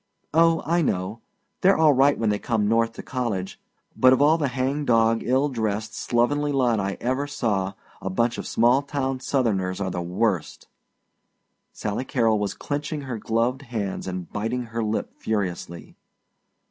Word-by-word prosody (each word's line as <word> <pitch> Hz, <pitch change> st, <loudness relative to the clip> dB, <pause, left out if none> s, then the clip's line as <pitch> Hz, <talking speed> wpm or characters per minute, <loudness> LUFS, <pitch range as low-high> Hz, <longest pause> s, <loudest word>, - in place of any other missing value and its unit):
"Oh, 165 Hz, 0 st, +4 dB
I 170 Hz, +3 st, +2 dB
know. 100 Hz, -, -2 dB, 0.4 s
They're 195 Hz, +1 st, +5 dB
all 155 Hz, -2 st, +5 dB
right 140 Hz, +2 st, +4 dB
when 110 Hz, -2 st, +1 dB
they 105 Hz, -, -1 dB
come 110 Hz, -4 st, 0 dB
North 115 Hz, +1 st, +2 dB
to -, -, -9 dB
college, 110 Hz, -8 st, -3 dB, 0.4 s
but 130 Hz, -, +6 dB
of 130 Hz, -, +4 dB
all 155 Hz, +3 st, +4 dB
the 145 Hz, -, +1 dB
hangdog, 125 Hz, -3 st, +1 dB
ill 130 Hz, +4 st, +2 dB
dressed, 110 Hz, -4 st, -2 dB
slovenly 145 Hz, +5 st, +1 dB
lot 125 Hz, -5 st, +2 dB
I 100 Hz, 0 st, -2 dB
ever 130 Hz, +4 st, -1 dB
saw, 105 Hz, -9 st, -1 dB, 0.3 s
a 95 Hz, -, -3 dB
bunch 115 Hz, +5 st, 0 dB
of -, -, -5 dB
small 120 Hz, +4 st, +3 dB
town 135 Hz, -2 st, -2 dB
Southerners 105 Hz, -9 st, 0 dB
are 95 Hz, -2 st, -2 dB
the 90 Hz, -, -3 dB
worst!" 90 Hz, 0 st, -1 dB, 1.0 s
Sally 105 Hz, +4 st, -3 dB
Carrol 115 Hz, -6 st, +1 dB
was 100 Hz, -2 st, -2 dB
clinching 150 Hz, +4 st, -3 dB
her 130 Hz, -5 st, -5 dB
gloved 115 Hz, +5 st, 0 dB
hands 110 Hz, -9 st, -4 dB
and 90 Hz, -2 st, -4 dB
biting 115 Hz, +4 st, -2 dB
her 115 Hz, 0 st, -4 dB
lip 110 Hz, 0 st, -2 dB
furiously. 90 Hz, -5 st, -3 dB
115 Hz, 160 wpm, -24 LUFS, 105-135 Hz, 1.0 s, but